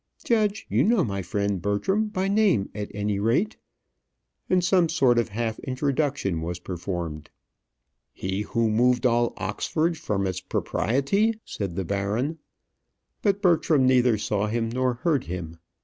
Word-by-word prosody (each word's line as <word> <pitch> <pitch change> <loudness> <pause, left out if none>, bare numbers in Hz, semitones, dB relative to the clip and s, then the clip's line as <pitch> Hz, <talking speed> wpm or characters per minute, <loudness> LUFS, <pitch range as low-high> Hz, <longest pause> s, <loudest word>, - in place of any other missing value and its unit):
Judge, 215 -2 +1
you - - +2
know 220 -3 +3
my 100 -6 -2
friend 100 +1 -1
Bertram, 190 - 0
by 195 -2 -2
name, 200 - +2
at 105 -1 -5
any 105 -1 -2
rate?" 120 - +1 0.9
and 180 -1 +3
some 175 -2 +3
sort 130 -7 +3
of 115 - -1
half 110 +1 -3
introduction 135 - -1
was 85 +1 -3
performed. 85 -4 -5 0.8
"He 95 +2 -3
who 115 +1 0
moved 125 +2 +3
all 120 -1 +2
Oxford 155 - -1
from 100 -9 -1
its 95 -1 -2
propriety?" 200 - 0
said 95 -5 -4
the 95 - -2
baron. 105 - -1 0.8
But 200 -1 +1
Bertram 160 -6 +4
neither 125 -3 +4
saw 105 0 -1
him 115 +1 -1
nor 125 +1 0
heard 140 +2 0
him. 85 -2 -6
120 Hz, 145 wpm, -25 LUFS, 100-160 Hz, 0.9 s, Bertram